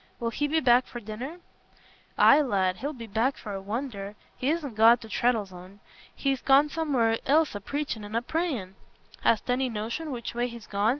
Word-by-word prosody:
Will 230 Hz, -1 st, -2 dB
he 290 Hz, +5 st, -1 dB
be 320 Hz, +2 st, +2 dB
back 250 Hz, -2 st, +4 dB
to 240 Hz, -, -7 dB
dinner?" 240 Hz, -, -7 dB, 0.8 s
"Aye, 285 Hz, +2 st, +7 dB
lad, 190 Hz, -8 st, +1 dB
he'll 285 Hz, +3 st, -3 dB
be 240 Hz, -6 st, -8 dB
back 225 Hz, +6 st, 0 dB
for 210 Hz, -, -7 dB
a 195 Hz, -, -5 dB
wonder. 205 Hz, -1 st, -5 dB, 0.2 s
He 260 Hz, -, -1 dB
isna 310 Hz, -4 st, -1 dB
gone 225 Hz, +2 st, +6 dB
to 225 Hz, -, -12 dB
Treddles'on. 200 Hz, -5 st, -2 dB, 0.4 s
He's 270 Hz, -2 st, -1 dB
gone 280 Hz, +2 st, +5 dB
somewhere 260 Hz, -9 st, +1 dB
else 310 Hz, +2 st, +3 dB
a 205 Hz, -, -5 dB
preachin' 280 Hz, -2 st, -3 dB
and 205 Hz, +2 st, -7 dB
a 230 Hz, -, 0 dB
prayin'." 265 Hz, -, -2 dB, 0.5 s
"Hast 225 Hz, -, +2 dB
any 255 Hz, +1 st, +1 dB
notion 235 Hz, +9 st, -4 dB
which 240 Hz, -4 st, -5 dB
way 240 Hz, +1 st, 0 dB
he's 235 Hz, -2 st, -10 dB
gone?" 205 Hz, +2 st, 0 dB
240 Hz, 190 wpm, -27 LUFS, 215-280 Hz, 0.8 s, Aye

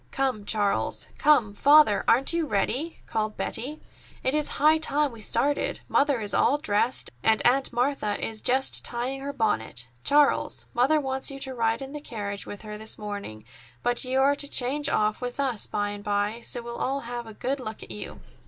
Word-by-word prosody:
"Come, 260 Hz, -6 st, -1 dB
Charles. 205 Hz, -2 st, -1 dB
Come, 250 Hz, -9 st, +4 dB
Father, 285 Hz, -2 st, +5 dB
aren't 260 Hz, +7 st, +4 dB
you 335 Hz, -2 st, 0 dB
ready?" 270 Hz, +9 st, -1 dB
called 215 Hz, -1 st, -2 dB
Betty. 280 Hz, +7 st, -4 dB, 0.4 s
"It 260 Hz, -, +1 dB
is 300 Hz, -1 st, +2 dB
high 310 Hz, +2 st, +5 dB
time 295 Hz, -2 st, +1 dB
we 230 Hz, -2 st, -11 dB
started. 285 Hz, +7 st, 0 dB
Mother 280 Hz, -4 st, +2 dB
is 205 Hz, -1 st, -1 dB
all 285 Hz, -, +3 dB
dressed, 240 Hz, -3 st, 0 dB
and 220 Hz, -1 st, +3 dB
Aunt 265 Hz, +2 st, +3 dB
Martha 240 Hz, -4 st, 0 dB
is 220 Hz, -1 st, -4 dB
just 265 Hz, +1 st, +3 dB
tying 250 Hz, +3 st, -2 dB
her 280 Hz, +1 st, -4 dB
bonnet. 120 Hz, -, 0 dB
Charles, 290 Hz, 0 st, +2 dB
Mother 270 Hz, +6 st, +3 dB
wants 265 Hz, -1 st, -1 dB
you 275 Hz, -, -6 dB
to 265 Hz, -1 st, -4 dB
ride 230 Hz, +1 st, 0 dB
in 270 Hz, -, -8 dB
the 295 Hz, -, -6 dB
carriage 205 Hz, -6 st, -6 dB
with 205 Hz, -, -8 dB
her 210 Hz, -1 st, -7 dB
this 220 Hz, 0 st, 0 dB
morning; 200 Hz, -, -7 dB, 0.4 s
but 245 Hz, 0 st, 0 dB
you 260 Hz, +1 st, 0 dB
are 280 Hz, +1 st, +4 dB
to 285 Hz, -, -1 dB
change 285 Hz, +4 st, +1 dB
off 215 Hz, +2 st, +1 dB
with 245 Hz, +2 st, -4 dB
us 260 Hz, -6 st, +1 dB
by 205 Hz, 0 st, -1 dB
and 205 Hz, 0 st, -7 dB
by, 205 Hz, +2 st, -1 dB
so 240 Hz, 0 st, -2 dB
we'll 235 Hz, 0 st, -7 dB
all 275 Hz, +2 st, -1 dB
have 240 Hz, -1 st, -6 dB
a 220 Hz, -, -10 dB
good 270 Hz, +5 st, -2 dB
look 220 Hz, -4 st, -7 dB
at -, -, -11 dB
you." 105 Hz, -1 st, -8 dB
245 Hz, 195 wpm, -26 LUFS, 215-275 Hz, 0.4 s, Father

